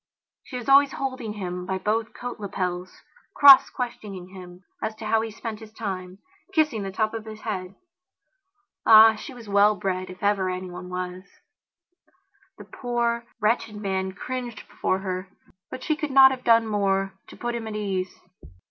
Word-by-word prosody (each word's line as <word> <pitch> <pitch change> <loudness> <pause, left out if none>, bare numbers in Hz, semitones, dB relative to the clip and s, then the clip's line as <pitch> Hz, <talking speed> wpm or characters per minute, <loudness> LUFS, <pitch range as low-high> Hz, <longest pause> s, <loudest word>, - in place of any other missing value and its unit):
She 255 - -7
was 245 - -7
always 275 0 +6
holding 260 -5 -4
him 180 -3 -5
by 190 0 -1
both 215 +3 -1
coat 245 -1 -6
lapels; 185 -3 -4 0.3
cross 280 -2 +9
questioning 205 -7 -6
him 180 -1 -12 0.2
as 220 0 -3
to 220 - -9
how 220 +1 +2
he 225 - -4
spent 220 0 -6
his 220 -1 -12
time; 190 -4 -5 0.4
kissing 305 - +2
the 195 - -4
top 215 +3 -1
of 225 -1 -5
his 215 0 -9
head. 190 -3 -5 1.1
Ah, 220 0 +9
she 220 +7 -9
was 240 -4 -12
well 205 +1 +4
bred, 185 -1 -3
if 185 +1 -11
ever 200 -2 +2
anyone 180 0 -6
was. 180 0 -5 1.4
The - - -11
poor, 235 -1 -2
wretched 220 0 0
man 190 -2 -2
cringed 245 +1 -6
before 185 - -1
herbut 185 +4 -8
she 310 - +1
could 300 -1 -3
not 265 -1 +8
have 255 -1 -5
done 230 -1 +5
more 195 -2 0
to - - -13
put 240 0 -3
him 230 -2 -4
at 215 - -5
his 210 - -3 0.2
ease. - - -23
215 Hz, 170 wpm, -25 LUFS, 190-235 Hz, 1.4 s, cross